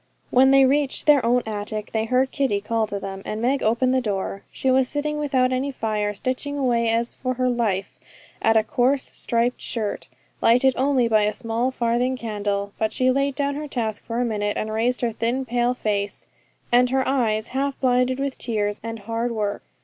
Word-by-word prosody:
When 260 +2 +6
they 270 0 +6
reached 280 +1 +1
their 295 -3 +5
own 245 +1 +2
attic 215 0 -4
they 220 0 0
heard 255 +3 +1
Kitty 270 -9 0
call 220 +1 -1
to 200 -1 -4
them, 195 0 -6
and 215 - -4
Meg 260 +4 +1
opened 240 +4 +2
her 260 - +2
door. 195 -3 -3
She 265 - 0
was 260 0 +3
sitting 300 0 -2
without 260 -3 +1
any 260 +2 -1
fire, 210 -4 -2
stitching 260 +6 -3
away 240 -4 +1
as 230 +1 0
for 255 0 -3
her 255 +1 0
life 215 -6 -1 0.4
at 225 0 +4
a 220 - +4
coarse 255 +4 0
striped 235 +1 0
shirt, 215 -3 -3 0.3
lighted 250 +3 +4
only 260 -2 +2
by 215 -2 +3
a 210 - 0
small 235 +1 -1
farthing 250 +1 0
candle; 205 -3 -3
but 220 -1 0
she 255 0 +2
laid 275 +1 0
down 285 0 0
her 300 +1 -5
task 225 -6 -3
for 230 +1 -4
a 245 - +1
minute, 205 -2 -1
and 215 - -2
raised 240 +3 0
her 240 -2 +1
thin 235 +4 -1
pale 240 +1 0
face, 205 -3 -2 0.5
and 245 +1 +5
her 265 0 +1
eyes 225 -5 0
half 275 +1 -2
blinded 250 0 +2
with 275 -1 -3
tears 210 -3 -1
and 225 -1 -6
hard 230 +3 -2
work. 210 -3 -2
240 Hz, 200 wpm, -23 LUFS, 220-260 Hz, 0.5 s, When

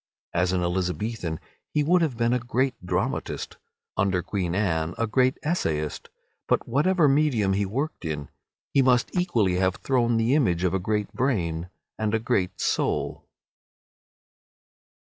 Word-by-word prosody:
As 90 +1 +2
an 90 -1 0
Elizabethan 90 0 -2 0.4
he 150 - +3
would 175 +4 +4
have 145 -8 0
been 115 0 +2
a 125 - +2
great 130 +2 0
dramatist; 90 - -2 0.4
under 95 -2 +1
Queen 90 -2 -2
Anne 85 -5 0
a 115 - +1
great 130 +3 +2
essayist. 80 - -1 0.4
But - - +1
whatever 155 +6 +3
medium 135 -9 +3
he 100 0 0
worked 135 +7 -3
in, 75 -3 -4 0.4
he 140 - +5
must 130 +3 +2
equally 115 - +2
have 95 0 +2
thrown 120 -3 +1
the 115 +3 +2
image 95 - +2
of 90 -1 +1
a 95 - +1
great 105 +2 -1
brain 90 -10 -1 0.3
and 110 0 +1
a - - +1
great 110 -6 -1
soul. - - -1
110 Hz, 145 wpm, -26 LUFS, 90-130 Hz, 0.4 s, he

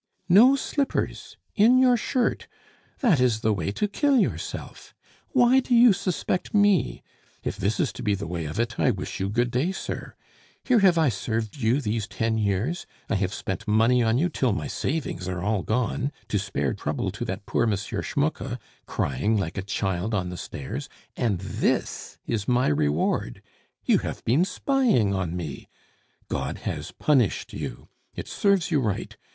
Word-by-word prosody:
"No 235 +10 +7
slippers! 275 0 -2 0.2
In 230 +5 +5
your 255 -1 +5
shirt! 240 +1 -1 0.5
That 210 - +4
is 120 -4 +2
the 110 - +2
way 100 -1 -2
to 210 - 0
kill 280 +6 +2
yourself! - - -3 0.3
Why 255 0 +5
do 250 -1 +1
you 235 -2 +7
suspect 185 0 -2
me? 205 -3 +3 0.4
If - - -2
this 100 +3 -1
is - - +1
to - - -8
be 105 -4 +1
the 100 - -5
way 85 0 -4
of 75 +7 -4
it, 115 -1 -1
I - - +4
wish 95 -4 -3
you 95 +1 -1
good 120 +3 0
day, 135 +10 +1
sir. 190 - -6 0.5
Here 250 -3 +4
have 185 -4 +5
I 160 -4 +4
served 110 0 -3
you 120 +2 +2
these 110 -4 -2
ten 110 +3 -1
years, 105 - -1 0.2
I - - +3
have 95 -1 -1
spent 95 -1 -5
money 115 +4 +4
on 115 0 +2
you 165 +7 +2
till 130 -8 0
my - - -3
savings 135 - -3
are 90 -1 -3
all 105 0 +1
gone, 125 +5 -1 0.2
to 105 - +1
spare 90 -9 -1
trouble - - -2
to - - -5
that 95 +2 -5
poor - - +1
M. 105 - +2
Schmucke, 100 - -2 0.3
crying 70 - 0
like 85 -5 -2
a 95 - -2
child 95 +1 -2
on 90 -3 -1
the - - -5
stairs 70 -5 -6 0.3
and 110 -6 0
this 95 - -2
is 110 -3 -2
my 125 -5 +3
reward! 75 -4 0 0.4
You - - +4
have - - -6
been 140 +10 +3
spying 215 - +2
on 90 -3 -2
me. 80 -5 -6 0.6
God - - -3
has - - -4
punished 130 -9 +1
you! - - -6 0.3
It - - -6
serves 195 -4 +1
you 155 - +3
right! 105 -5 -2
115 Hz, 175 wpm, -25 LUFS, -, 0.6 s, No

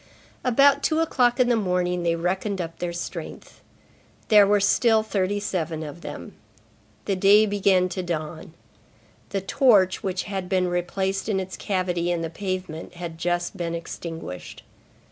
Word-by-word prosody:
About 275 +3 +4
two 315 - +1
o'clock 250 -6 +2
in 250 - +4
the 240 - +3
morning, 180 -4 0
they 170 -1 +1
reckoned 190 +4 -2
up 165 -2 -5
their 175 -1 -2
strength. 170 0 -7 0.7
There 210 -3 +7
were 205 0 +4
still 220 +3 +3
thirty 205 -1 -1
seven 165 -6 -3
of 155 +3 -8
them. - - -8 0.7
The 195 - 0
day 200 +3 +6
began 195 -3 +2
to 185 - -3
dawn. 160 -2 -5 0.7
The 195 - -2
torch, 200 -4 +3
which 185 -1 -2
had 190 -3 -5
been 185 -2 +1
replaced 190 +3 -2
in 195 -3 +1
its 190 0 -5
cavity 180 -3 -1
in 170 -1 -1
the 165 - -4
pavement, 185 -3 -5
had 170 -2 -7
just 175 +2 -1
been 170 -2 -3
extinguished. 165 - -7
185 Hz, 155 wpm, -24 LUFS, 175-205 Hz, 0.7 s, There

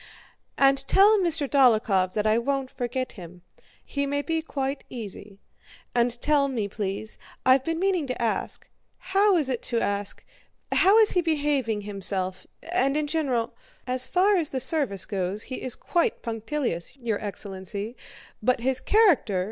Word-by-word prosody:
"And 275 0 +4
tell 415 +2 +6
Mr. 330 -6 +2
Dólokhov 215 -9 +3
that 210 -1 -1
I 215 +1 +3
won't 270 +1 -2
forget 255 +1 -3
him—he 180 - -8
may 285 +1 -1
be 325 0 -1
quite 275 -3 -4
easy. 205 -3 -8 0.6
And 240 0 +1
tell 290 -2 +3
me, 235 -7 -2
please—I've 220 +6 -1
been 330 +3 -2
meaning 365 -4 0
to 255 - -4
ask—how 380 - -1
is 285 -5 0 1.6
he 360 - +2
behaving 285 -9 0
himself, 195 -2 -2 0.2
and 295 -6 +2
in 305 - 0
general..." 275 -7 -1 0.3
"As 255 0 +2
far 375 +7 +3
as 325 -4 0
the 265 - -2
service 260 - +1
goes 195 +1 -2
he 255 - -6
is 255 - -2
quite 345 -1 -1
punctilious, 225 - -3
your 230 -5 -3
excellency; 200 +2 -5 0.5
but 250 +2 +1
his 260 +1 +1
character..." 355 - +3
255 Hz, 130 wpm, -25 LUFS, 215-295 Hz, 1.6 s, tell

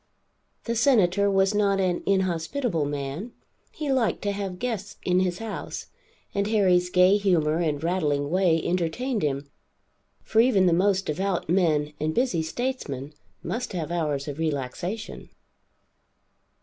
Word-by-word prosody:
The 235 - -2
Senator 200 -6 +3
was 195 +1 +3
not 200 -1 +2
an 180 -2 0
inhospitable 185 - 0
man, 145 - -4 0.4
he 295 -3 -3
liked 255 -4 +1
to 205 - 0
have 195 -2 -4
guests 215 -3 -4
in 180 0 +2
his 180 -1 0
house, 225 -1 -6 0.4
and 200 0 0
Harry's 185 -5 +3
gay 180 +2 +5
humor 170 -6 +2
and 155 -3 -1
rattling 150 -5 0
way 180 -3 +3
entertained 185 +8 -1
him; 140 -1 -1 0.8
for 220 - +1
even 225 -6 +5
the 175 - +4
most 195 +2 +2
devout 180 +2 -2
men 155 -5 +2
and 155 +1 -1
busy 240 -10 +1
statesmen 160 - -4 0.3
must 240 -1 -3
have 170 -3 -3
hours 150 -5 -1
of 145 +1 -5
relaxation. 160 - -4
180 Hz, 135 wpm, -25 LUFS, 160-205 Hz, 0.8 s, gay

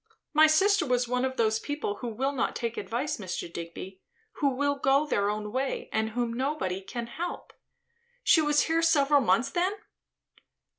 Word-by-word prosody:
My 310 +1 +7
sister 385 +4 +4
was 250 -3 +1
one 250 +1 0
of 260 0 -2
those 220 -1 +2
people 290 -8 -3
who 245 - -5
will 255 +5 -1
not 275 - -1
take 235 -1 -3
advice, 240 +10 -3
Mr. 185 -6 -5
Digby; 170 +3 -8 0.4
who 285 - +2
will 285 +2 +1
go 275 +1 +2
their 205 -8 0
own 210 0 -3
way, 260 +3 -3
and 220 0 0
whom 235 +1 -2
nobody 245 -8 -2
can 235 +4 -5
help. 340 +9 -6 0.7
She 320 - +5
was 295 -1 +3
here 325 0 +1
several 290 -3 +4
months, 255 +2 +2
then?" 360 +5 +1
260 Hz, 170 wpm, -28 LUFS, 220-295 Hz, 0.7 s, My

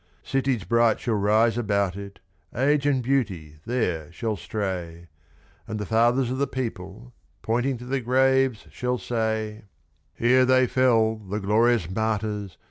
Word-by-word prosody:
Cities 130 -5 -1
bright 115 +4 +2
shall 115 - -1
rise 110 +3 +2
about 100 -4 0
it, 100 0 -9 0.4
Age 140 +3 +2
and 135 -3 +1
Beauty 95 - -1
there 90 -11 -1
shall 110 +4 -3
stray, 90 -5 -5 0.6
And 110 - -4
the 105 - -4
fathers 120 +4 +2
of 130 - -3
the 140 - +1
people, 115 -1 -6 0.3
pointing 120 +3 0
to 120 - -10
the 135 +1 -2
graves, 130 -1 +2
shall 125 0 -2
say: 110 -2 -3 0.5
"Here 125 +4 +4
they 130 0 +4
fell, 115 -3 +2
the 105 0 -5
glorious 110 -1 +2
martyrs! 105 -1 -2
115 Hz, 140 wpm, -25 LUFS, 100-125 Hz, 0.6 s, Here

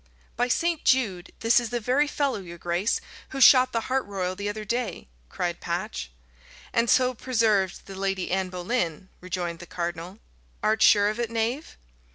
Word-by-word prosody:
"By 245 +1 +1
St. 330 +5 0
Jude! 205 -9 +1
this 230 +2 +5
is 240 -2 -4
the 240 - -2
very 255 +6 +2
fellow, 280 -6 -1
your 170 -2 -9
grace, 175 +5 0 0.3
who 270 - -5
shot 255 -1 +7
the 230 - 0
hart 260 +3 0
royal 185 -2 -3
the 205 +2 -3
other 215 +1 -5
day," 235 - -3 0.2
cried - - -3
Patch. - - -4 0.6
"And 230 0 +2
so 255 0 +4
preserved 220 -6 +1
the 195 - -9
Lady 195 -1 -2
Anne 190 0 0
Boleyn," 180 -1 -2
rejoined 175 -2 -4
the 175 - -10
cardinal. 175 +2 -5 0.5
"Art 215 0 +2
sure 205 -1 +6
of 215 +2 -4
it, 235 -2 -1
knave?" 230 +6 -2
215 Hz, 175 wpm, -26 LUFS, 185-245 Hz, 0.6 s, shot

